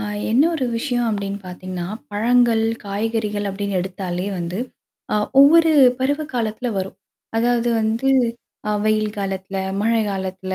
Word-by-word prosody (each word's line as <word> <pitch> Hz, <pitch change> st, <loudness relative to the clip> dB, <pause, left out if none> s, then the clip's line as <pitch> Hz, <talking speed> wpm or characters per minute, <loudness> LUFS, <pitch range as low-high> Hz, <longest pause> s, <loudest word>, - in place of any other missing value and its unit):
ஆ -, -, -3 dB, 0.3 s
என்ன 250 Hz, +6 st, +5 dB
ஒரு 275 Hz, -5 st, -1 dB
விஷயம் 245 Hz, -2 st, -1 dB
அப்படின்னு 200 Hz, -1 st, -3 dB
பாத்தீங்கன்னா, 180 Hz, -1 st, -6 dB, 0.3 s
பழங்கள், 230 Hz, +1 st, +3 dB, 0.2 s
காய்கறிகள் 210 Hz, 0 st, -2 dB
அப்டின்னு 195 Hz, -1 st, -2 dB
எடுத்தாலே 180 Hz, 0 st, -4 dB
வந்து 175 Hz, +2 st, -4 dB, 0.5 s
ஆ -, -, +3 dB, 0.2 s
ஒவ்வொரு 325 Hz, +3 st, +7 dB, 0.3 s
பருவ 285 Hz, +4 st, 0 dB
காலத்தல 235 Hz, 0 st, -2 dB
வரும். 190 Hz, 0 st, -3 dB, 0.4 s
அதாவது 240 Hz, +1 st, +2 dB
வந்து 225 Hz, +4 st, 0 dB, 0.6 s
அ -, -, +1 dB
வெயில் 215 Hz, -1 st, +2 dB
காலத்தில, 195 Hz, -1 st, -4 dB, 0.2 s
மழை 230 Hz, +1 st, +2 dB
காலத்தில, 190 Hz, 0 st, -4 dB
210 Hz, 130 wpm, -21 LUFS, 190-240 Hz, 0.6 s, ஒவ்வொரு